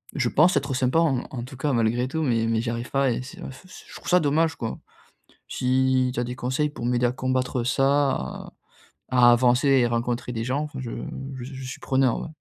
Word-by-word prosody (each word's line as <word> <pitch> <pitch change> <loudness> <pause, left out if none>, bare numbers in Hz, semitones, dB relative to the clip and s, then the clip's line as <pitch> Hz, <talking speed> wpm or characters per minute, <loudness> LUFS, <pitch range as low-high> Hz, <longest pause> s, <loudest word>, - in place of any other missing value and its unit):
je 130 -4 +1
pense 180 +9 +4
être 135 - -1
sympa, 130 +4 +2
en 150 -7 +2
en 120 -2 -5
tout 135 - -11
cas, 145 +1 -1
malgré 115 +1 +1
tout, 160 +2 -2
mais 115 -4 +1
mais 115 -1 +1
j'y 115 - -3
arrive 120 +1 -5
pas 135 -1 +2
et 120 - -2
c'est, 135 - -11
heu, - - -6
f 130 - -13
ch - - -13
je - - -12
trouve - - -8
ça 180 - +5
dommage, 155 +1 +1
quoi. 115 -1 -4 0.7
Si 130 0 +1
tu 120 - -3
as 120 - +1
des 125 +1 -5
conseils, 130 +4 -1
pour 130 -5 -7
m'aider 120 0 +1
à - - 0
combattre 130 -1 -1
ça 135 +2 +2
à 65 - -5 0.6
à 120 -1 +6
avancer 125 +3 +3
et 130 -3 +4
rencontrer 120 +1 -2
des 115 -1 -3
gens, 130 +5 -1
enfin, 145 -3 -7
je 120 -3 -5 0.4
je 125 - -7
je 130 - -7
suis - - -7
preneur, 130 -2 +1
ouais. - - -7
130 Hz, 235 wpm, -24 LUFS, 120-135 Hz, 0.7 s, à